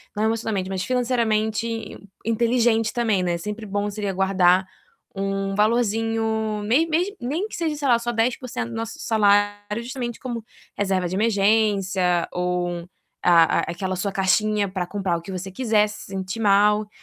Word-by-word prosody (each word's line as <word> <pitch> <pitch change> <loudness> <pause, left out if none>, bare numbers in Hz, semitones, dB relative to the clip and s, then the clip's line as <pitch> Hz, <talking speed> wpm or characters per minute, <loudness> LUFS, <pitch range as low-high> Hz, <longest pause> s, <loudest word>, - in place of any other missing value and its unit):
não 210 - -1
emocionalmente 220 -4 -1
mas 190 -1 -2
financeiramente 230 -3 0 0.6
inteligente 230 -1 +2
também, 220 -6 +1
né. 175 -1 0
Sempre 210 +5 -6
bom 205 +1 -2
seria 205 -1 -3
guardar 185 -1 +3 0.5
um 195 0 -2
valorzinho, 220 -1 +1
mes 275 +10 +3
mes 350 +6 +1
nem 310 - -2
que - - -7
seja 320 -3 -1
sei 290 -2 -2
lá 235 -2 +4
só 240 0 -3
10% 230 - -1
do - - -7
nosso 225 0 -4
salário 205 0 +2
justamente 245 -2 -5
como 240 -4 -5 0.3
reserva 190 -3 0
de 185 - -3
emergência 195 -4 +2
ou 175 -1 -2 0.4
a 170 -2 +5
aquela 185 +2 -3
sua 195 +2 -1
caixinha 205 +1 +2
para 185 -2 -3
comprar 190 -4 -1
o - - -8
que 180 - -9
você 190 +1 -5
quiser, 215 -2 +2
se - - -9
sentir 190 +2 -5
mal. 210 0 +4
210 Hz, 155 wpm, -23 LUFS, 190-230 Hz, 0.6 s, a